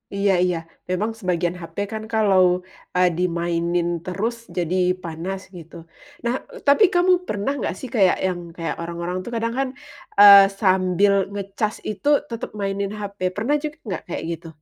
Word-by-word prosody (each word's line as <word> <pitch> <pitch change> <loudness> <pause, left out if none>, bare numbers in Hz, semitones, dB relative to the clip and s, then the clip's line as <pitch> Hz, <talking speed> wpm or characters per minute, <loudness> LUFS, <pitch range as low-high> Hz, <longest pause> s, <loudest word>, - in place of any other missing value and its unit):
Iya 200 0 +2
iya, 180 -1 +1 0.3
memang 200 +5 0
sebagian 175 -3 -1
HP 165 - -11 0.2
kan 220 0 -4
kalau, 200 -4 +4 0.5
eee, 180 0 +5
dimainin 170 -1 0 0.2
terus 205 +6 -2 0.2
jadi 175 0 0 0.3
panas, 170 +3 -4 0.2
gitu. 170 0 -12 0.5
Nah, 235 - +1 0.2
e - - -9
tapi 280 +9 +6
kamu 355 +1 +4 0.2
pernah 205 +5 -1
nggak - - -2
sih 260 - -6
kayak, 190 -5 +4
yang 180 -1 -2 0.2
kayak 165 -1 -3
orang-orang 170 +1 -4
tuh 240 - -7
kadang 230 0 -1
kan, 270 - +1 0.5
eee, 200 -1 +11 0.2
sambil 190 0 +3 0.2
ngecas 200 +2 -3
itu 210 +6 -5 0.2
tetap 230 -2 -5
mainin 200 0 -2
HP, 200 -1 -7 0.2
pernah 240 +8 +1
juga 305 +1 -5
nggak 190 - -3
kayak 175 - -4
gitu? 165 0 -6
195 Hz, 160 wpm, -22 LUFS, 175-210 Hz, 0.5 s, eee